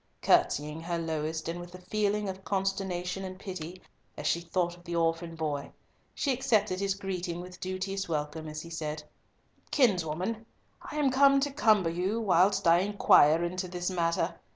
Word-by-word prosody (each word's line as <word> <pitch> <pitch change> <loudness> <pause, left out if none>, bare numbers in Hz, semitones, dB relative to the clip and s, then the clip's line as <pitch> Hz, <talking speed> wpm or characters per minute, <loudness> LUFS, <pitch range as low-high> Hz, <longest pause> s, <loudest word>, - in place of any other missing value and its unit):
Curtseying 150 +2 +2
her 170 +1 -2
lowest 160 -1 -3
and 170 +1 -3
with 175 +1 -9
a - - -7
feeling 205 +2 -1
of 190 0 -6
consternation 195 -1 -2
and 185 0 -6
pity, 185 -2 -7 0.4
as - - -6
she 170 - +1
thought 175 0 -1
of 175 - -18
the 170 -1 -5
orphan 165 0 0
boy, 150 -3 -3 0.4
she 275 - +1
accepted 215 -7 +1
his 195 -1 0
greeting 180 -3 -4
with 180 0 -9
duteous 190 0 -3
welcome 155 0 -3
as 155 0 -6
he 170 - -10
said, 155 -2 -4 0.7
"Kinswoman, 205 - +1 0.3
I - - -9
am 290 -3 +2
come 275 +1 +5
to 285 0 0
cumber 215 - +3
you, 185 +6 -1
whilst 190 -2 +3
I 170 +1 +6
inquire 175 -5 +5
into 185 +2 -2
this 180 +1 -3
matter. 170 -2 0
180 Hz, 170 wpm, -29 LUFS, 165-195 Hz, 0.7 s, I